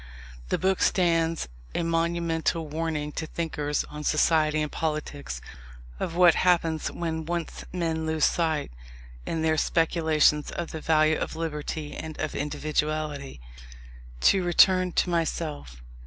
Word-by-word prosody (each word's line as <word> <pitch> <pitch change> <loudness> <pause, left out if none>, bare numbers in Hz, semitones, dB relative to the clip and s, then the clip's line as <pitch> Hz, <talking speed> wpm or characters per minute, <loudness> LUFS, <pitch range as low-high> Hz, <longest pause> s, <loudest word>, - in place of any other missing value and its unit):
The - - +1
book 190 0 +1
stands 165 - +2 0.3
a - - 0
monumental 165 -1 0
warning 155 -1 -2
to 160 +1 -4
thinkers 155 -3 -2
on 150 0 -8
society 155 0 +3
and 150 - -4
politics, 150 - -3 0.6
of 165 - -3
what 175 -1 +7
happens 165 -3 +2
when 160 -2 -3
once 170 0 -4
men 165 -3 -2
lose 160 -1 +2
sight, 160 - 0 0.6
in 160 -1 -1
their 160 0 +2
speculations, 160 -2 +2
of 170 -1 -5
the 160 - -6
value 155 0 +3
of - - -4
Liberty 155 -1 -4
and 160 -1 -7
of 155 - -2
Individuality. 150 - -2 0.8
To 195 - +5
return 185 +1 +5
to - - +1
myself. 150 - -3
160 Hz, 130 wpm, -26 LUFS, 150-165 Hz, 0.8 s, what